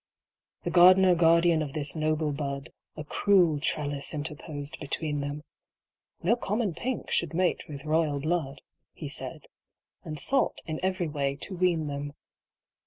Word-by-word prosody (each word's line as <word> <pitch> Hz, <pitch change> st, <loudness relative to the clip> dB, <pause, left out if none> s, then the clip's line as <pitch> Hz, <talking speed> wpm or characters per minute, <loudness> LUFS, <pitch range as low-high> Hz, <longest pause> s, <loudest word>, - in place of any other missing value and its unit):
The -, -, -2 dB
gardener 185 Hz, +1 st, +7 dB
guardian 170 Hz, -1 st, +4 dB
of 145 Hz, -3 st, -4 dB
this 145 Hz, 0 st, -1 dB
noble 155 Hz, -1 st, 0 dB
bud 140 Hz, 0 st, -4 dB, 0.3 s
A 155 Hz, -, -4 dB
cruel 175 Hz, -1 st, +3 dB
trellis 145 Hz, 0 st, -2 dB
interposed 150 Hz, -1 st, -6 dB
between 150 Hz, 0 st, -2 dB
them. 145 Hz, +1 st, -5 dB, 0.8 s
No 205 Hz, +8 st, +4 dB
common 210 Hz, -4 st, -1 dB
Pink 245 Hz, +9 st, -4 dB
should 170 Hz, -1 st, 0 dB
mate 180 Hz, 0 st, 0 dB
with 140 Hz, 0 st, -8 dB
royal 155 Hz, -2 st, +1 dB
blood, 155 Hz, -2 st, -2 dB, 0.3 s
He -, -, -7 dB
said, -, -, -5 dB, 0.6 s
and 155 Hz, -, -6 dB
sought 270 Hz, -, +1 dB
in 155 Hz, -1 st, -4 dB
every 185 Hz, -2 st, 0 dB
way 140 Hz, -2 st, -1 dB
to 190 Hz, -, -7 dB
wean 175 Hz, -3 st, +1 dB
them. 145 Hz, 0 st, -4 dB
155 Hz, 145 wpm, -28 LUFS, 145-175 Hz, 0.8 s, gardener